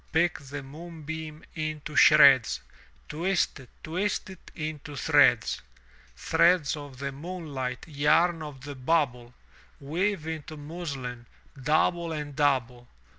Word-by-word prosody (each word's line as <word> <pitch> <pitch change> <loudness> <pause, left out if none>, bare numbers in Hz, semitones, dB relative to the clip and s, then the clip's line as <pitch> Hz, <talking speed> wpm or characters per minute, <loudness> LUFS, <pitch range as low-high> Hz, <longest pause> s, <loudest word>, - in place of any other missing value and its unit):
Pick 160 +1 +2
the 140 0 -7
moonbeam 160 +1 -8
into 155 -1 -4
shreds. 140 -7 +7 0.5
Twist 175 +1 0
it, 125 - -14
twist 190 +4 -2
it 190 - -13
into 155 -2 -5
threads! 135 - +3 0.5
Threads 170 - +3
of 145 -3 -9
the 140 +1 -4
moonlight, 140 -5 -5
yarn 160 +3 +2
of 145 -4 -8
the 145 +1 -7
bubble. 125 -4 0 0.4
Weave 170 +4 -1
into 160 -1 -6
muslin, 140 -6 -6 0.4
double 165 +4 +2
and 150 -2 -5
double! 130 -4 +1
150 Hz, 115 wpm, -27 LUFS, 135-165 Hz, 0.5 s, shreds